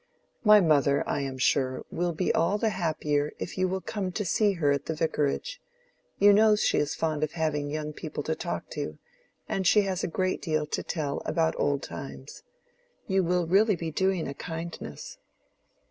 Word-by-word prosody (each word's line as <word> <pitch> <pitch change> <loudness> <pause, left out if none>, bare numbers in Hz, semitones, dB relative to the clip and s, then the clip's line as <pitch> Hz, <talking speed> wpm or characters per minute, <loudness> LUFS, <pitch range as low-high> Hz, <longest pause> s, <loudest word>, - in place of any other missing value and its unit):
My 210 -1 +8
mother, 145 -4 +3
I - - 0
am 135 -1 -4
sure, 130 0 +1
will 175 0 -1
be 170 +2 0
all 175 +5 +2
the 220 0 +1
happier 150 -5 -1
if - - -6
you 185 0 +1
will 190 +1 -2
come 195 -3 -3
to 210 - -2
see 200 +5 +2
her 155 -6 +1
at 140 -1 -1
the 160 - -2
vicarage: 160 - -1 0.6
you 205 +1 +6
know 215 +1 +6
she 210 - +2
is 145 0 -1
fond 155 -2 -1
of 155 - -2
having 150 -3 -1
young 150 0 -4
people 150 -1 -5
to 160 - -1
talk - - -4
to, - - -4 0.5
and 190 -2 0
she 210 - +6
has 190 -2 -2
a - - +1
great 185 +2 -1
deal 155 -2 0
to 150 - -3
tell 145 -4 -3
about 160 -1 +1
old 140 -1 +1
times. 70 -5 -8 0.6
You 190 0 +2
will 180 0 +1
really 200 +5 +4
be 165 -1 -4
doing 190 +1 0
a 140 - -4
kindness." 165 - -7
165 Hz, 190 wpm, -27 LUFS, 150-190 Hz, 0.6 s, My